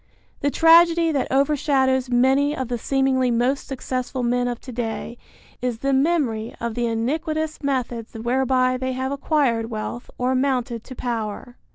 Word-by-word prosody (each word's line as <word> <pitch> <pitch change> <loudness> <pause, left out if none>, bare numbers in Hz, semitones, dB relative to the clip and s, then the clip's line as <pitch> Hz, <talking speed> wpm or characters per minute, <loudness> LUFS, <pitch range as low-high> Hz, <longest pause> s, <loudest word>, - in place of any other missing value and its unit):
The 285 - +1
tragedy 330 +1 +5
that 280 -4 -1
overshadows 265 -2 +2
many 265 +4 +3
of 260 -2 -3
the 245 - -1
seemingly 265 0 +1
most 245 +4 0
successful 255 -1 -3
men 245 +1 +1
of 240 -1 -3
to 255 - -9
day 235 0 -4 0.5
is 245 -2 -1
the 275 +4 0
memory 265 -7 0
of 235 -1 -3
the 240 +1 -1
iniquitous 310 +7 -2
methods 245 -5 -3
whereby 255 +2 +1
they 260 0 -2
have 260 +1 -2
acquired 270 -5 0
wealth 225 +2 -5
or 250 +1 0
mounted 255 -3 0
to 255 - -9
power. 235 0 -4
255 Hz, 155 wpm, -22 LUFS, 240-275 Hz, 0.5 s, tragedy